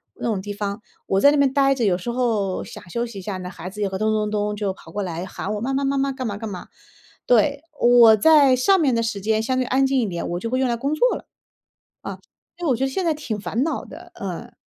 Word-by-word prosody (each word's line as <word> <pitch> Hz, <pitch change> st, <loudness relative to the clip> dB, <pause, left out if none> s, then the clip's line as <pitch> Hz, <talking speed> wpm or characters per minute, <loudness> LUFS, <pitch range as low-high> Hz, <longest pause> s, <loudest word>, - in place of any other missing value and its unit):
那 -, -, -4 dB
种 205 Hz, -4 st, -1 dB
地 205 Hz, +1 st, -5 dB
方， 205 Hz, +1 st, -4 dB, 0.3 s
我 195 Hz, -, +2 dB
在 285 Hz, -, +7 dB
那 -, -, +2 dB
边 275 Hz, -2 st, +3 dB
呆 275 Hz, -1 st, +3 dB
着 245 Hz, -, -2 dB
有 185 Hz, -4 st, +2 dB
时 215 Hz, +6 st, -6 dB
候 220 Hz, -6 st, 0 dB
想 180 Hz, -, -11 dB
休 235 Hz, +6 st, -2 dB
息 220 Hz, -4 st, -8 dB
一 -, -, -7 dB
下 195 Hz, 0 st, -4 dB
呢， 180 Hz, 0 st, -6 dB
孩 180 Hz, 0 st, -8 dB
子 210 Hz, +2 st, -8 dB
也 200 Hz, -, +1 dB
会 190 Hz, -, -4 dB
咚 215 Hz, +1 st, +1 dB
咚 210 Hz, -1 st, -1 dB
咚 210 Hz, 0 st, -1 dB
就 205 Hz, -2 st, -2 dB
跑 165 Hz, -3 st, -15 dB
过 205 Hz, -1 st, -2 dB
来 175 Hz, 0 st, -4 dB
喊 195 Hz, +2 st, -5 dB
我：” -, -, -3 dB
妈 270 Hz, +3 st, -1 dB
妈 275 Hz, +1 st, 0 dB
妈 275 Hz, 0 st, 0 dB
妈， 275 Hz, 0 st, 0 dB
干 260 Hz, -1 st, -5 dB
嘛 205 Hz, -2 st, -3 dB
干 220 Hz, 0 st, -6 dB
嘛。 185 Hz, -3 st, -8 dB, 0.6 s
“对， 280 Hz, +5 st, +3 dB, 0.2 s
我 240 Hz, -2 st, +7 dB
在 280 Hz, +2 st, +6 dB
上 380 Hz, +10 st, +3 dB
面 270 Hz, -6 st, +2 dB
的 230 Hz, -, +1 dB
时 215 Hz, -3 st, -2 dB
间 220 Hz, +2 st, 0 dB
相 255 Hz, +2 st, 0 dB
对 255 Hz, -, +1 dB
安 270 Hz, +2 st, +2 dB
静 265 Hz, -1 st, +2 dB
一 230 Hz, -, +1 dB
点， 170 Hz, -2 st, -4 dB
我 175 Hz, +1 st, -2 dB
就 230 Hz, -, -4 dB
会 255 Hz, +1 st, 0 dB
用 255 Hz, -, +1 dB
来 235 Hz, -, 0 dB
工 280 Hz, +5 st, -1 dB
作 -, -, +3 dB
了。 -, -, -14 dB, 0.8 s
啊， -, -, -7 dB, 0.4 s
所 350 Hz, -, -5 dB
以 -, -, +2 dB
我 250 Hz, -, +3 dB
觉 265 Hz, -, -1 dB
得 -, -, -1 dB
现 360 Hz, +6 st, -2 dB
在 325 Hz, -, +2 dB
挺 245 Hz, -8 st, -4 dB
烦 230 Hz, +5 st, -1 dB
恼 325 Hz, -, -2 dB
的 -, -, -12 dB
嗯。 -, -, -6 dB
230 Hz, 305 characters per minute, -22 LUFS, 200-270 Hz, 0.8 s, 在